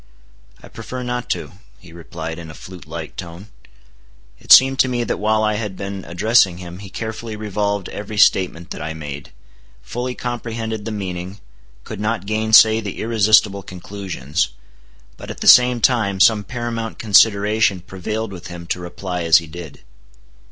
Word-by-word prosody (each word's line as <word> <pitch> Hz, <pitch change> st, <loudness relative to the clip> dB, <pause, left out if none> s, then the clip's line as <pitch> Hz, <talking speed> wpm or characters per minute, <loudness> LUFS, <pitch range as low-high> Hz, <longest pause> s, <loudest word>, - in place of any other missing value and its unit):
"I -, -, -11 dB
prefer 125 Hz, +3 st, -7 dB
not 125 Hz, 0 st, -4 dB
to," -, -, -3 dB, 0.3 s
he 90 Hz, -3 st, -16 dB
replied 80 Hz, -1 st, -7 dB
in 85 Hz, -2 st, -9 dB
a 75 Hz, -, -11 dB
flute 90 Hz, +5 st, -12 dB
like 80 Hz, 0 st, -7 dB
tone. 90 Hz, +3 st, -9 dB, 0.9 s
It -, -, -6 dB
seemed 135 Hz, 0 st, +8 dB
to -, -, +5 dB
me 120 Hz, -1 st, -1 dB
that -, -, -2 dB
while 110 Hz, +1 st, +1 dB
I 105 Hz, -1 st, +1 dB
had 105 Hz, -4 st, -5 dB
been 100 Hz, -1 st, -6 dB
addressing 95 Hz, +1 st, +2 dB
him, 90 Hz, 0 st, -9 dB
he 100 Hz, -1 st, -10 dB
carefully 110 Hz, +2 st, -6 dB
revolved 100 Hz, -2 st, -2 dB
every 105 Hz, +1 st, -7 dB
statement 90 Hz, -4 st, +2 dB
that -, -, -6 dB
I 80 Hz, +1 st, -5 dB
made; 70 Hz, -2 st, -8 dB, 0.5 s
fully 125 Hz, +1 st, -4 dB
comprehended 115 Hz, -3 st, -5 dB
the 115 Hz, -, -4 dB
meaning; 95 Hz, -1 st, -5 dB, 0.4 s
could -, -, -8 dB
not 105 Hz, -2 st, -2 dB
gainsay 110 Hz, +1 st, +5 dB
the 100 Hz, -3 st, -6 dB
irresistible 110 Hz, -3 st, +3 dB
conclusions; 90 Hz, -5 st, -4 dB, 0.7 s
but, -, -, -10 dB
at -, -, -8 dB
the -, -, -1 dB
same 125 Hz, -1 st, +7 dB
time, 110 Hz, -6 st, +1 dB
some 105 Hz, +1 st, +5 dB
paramount 115 Hz, 0 st, -4 dB
consideration 105 Hz, -1 st, +3 dB
prevailed 100 Hz, +5 st, -5 dB
with 90 Hz, -2 st, -9 dB
him 85 Hz, -1 st, -9 dB
to -, -, -1 dB
reply 90 Hz, +1 st, -5 dB
as 85 Hz, -1 st, +6 dB
he 85 Hz, -, -3 dB
did. 80 Hz, -2 st, -10 dB
100 Hz, 165 wpm, -20 LUFS, 90-110 Hz, 0.9 s, seemed